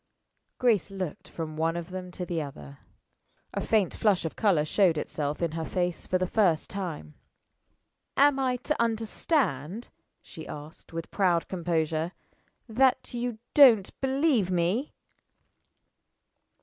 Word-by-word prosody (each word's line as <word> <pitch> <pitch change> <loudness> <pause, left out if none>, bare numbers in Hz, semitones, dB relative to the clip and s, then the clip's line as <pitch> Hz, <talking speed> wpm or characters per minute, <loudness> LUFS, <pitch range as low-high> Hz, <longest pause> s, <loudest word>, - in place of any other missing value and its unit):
Grace 230 -7 +2
looked 190 -5 -5
from 160 -2 -5
one 165 +1 0
of 170 +1 -6
them 185 -1 -6
to 180 0 -5
the 170 -2 -2
other. 75 - -9 0.7
A - - -2
faint 210 -5 +2
flush 200 -6 +2
of 160 - -4
color 180 -8 +2
showed 175 0 +3
itself 150 +1 -3
in 165 - 0
her 165 0 -3
face 175 +1 -2
for 185 - +2
the 185 - 0
first 180 -5 +1
time. 170 - -5 1.0
"Am 280 0 +5
I 255 -2 +1
to 255 +2 -2
understand," 225 - -1 0.3
she 160 - -10
asked, 150 +2 -10
with 165 0 -6
proud 180 -4 +2
composure, 165 -1 -1 0.5
"that 250 +3 +2
you 240 -1 -3 0.2
don't 235 -9 +7
believe 265 - +2
me?" 185 - 0
180 Hz, 135 wpm, -28 LUFS, 160-225 Hz, 1.0 s, don't